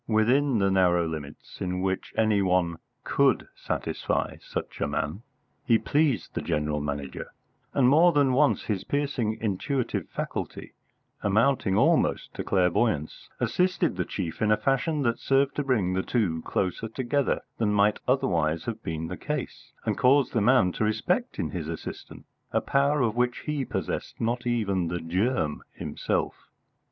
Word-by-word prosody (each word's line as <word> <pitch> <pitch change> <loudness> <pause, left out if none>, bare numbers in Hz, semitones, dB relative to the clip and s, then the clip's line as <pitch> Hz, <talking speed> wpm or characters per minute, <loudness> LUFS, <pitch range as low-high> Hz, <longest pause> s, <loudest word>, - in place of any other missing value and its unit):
Within 120 +5 +3
the 100 -1 +2
narrow 90 -2 +3
limits 75 -3 -8
in 90 -1 -2
which 95 0 -2
any 110 -2 +3
one 90 -3 +1 0.3
could - - +2
satisfy - - -2
such - - -6
a - - +1
man, 80 +8 -2 0.4
he 115 - +4
pleased 140 - 0
the - - -2
General 75 0 -1
Manager; 70 -2 -5 0.4
and 130 -3 +4
more 160 +6 +6
than 140 -4 +3
once 145 +2 +3
his 100 -4 -2
piercing 140 -6 -1
intuitive 115 +5 -2
faculty, - - -5 0.5
amounting 110 -1 +2
almost - - +2
to - - -4
clairvoyance, 90 -3 0
assisted 180 -1 +1
the - - 0
chief 85 -5 -5
in 110 - +2
a 105 - +5
fashion 135 +6 0
that 120 -2 0
served 135 0 +2
to 145 - +1
bring 110 -9 +1
the 95 - +1
two 95 -8 0
closer 95 +7 -2
together 130 +4 0 0.2
than 110 -2 +2
might 105 0 +3
otherwise 85 - +1
have 115 -1 -4
been 80 -4 -4
the - - -5
case, - - -5
and - - -1
caused 135 +2 +4
the 115 - +2
man 110 -5 +4
to 110 - -2
respect 105 0 0
in - - -2
his - - -4
assistant - - -7 0.3
a - - +2
power 140 +1 +2
of 115 -3 +1
which 125 0 0
he 150 -2 -1
possessed 95 -8 -4
not 120 +2 -1
even 100 -7 0
the 85 +1 -2
germ 90 - 0
himself. - - -3
110 Hz, 160 wpm, -27 LUFS, 90-130 Hz, 0.5 s, more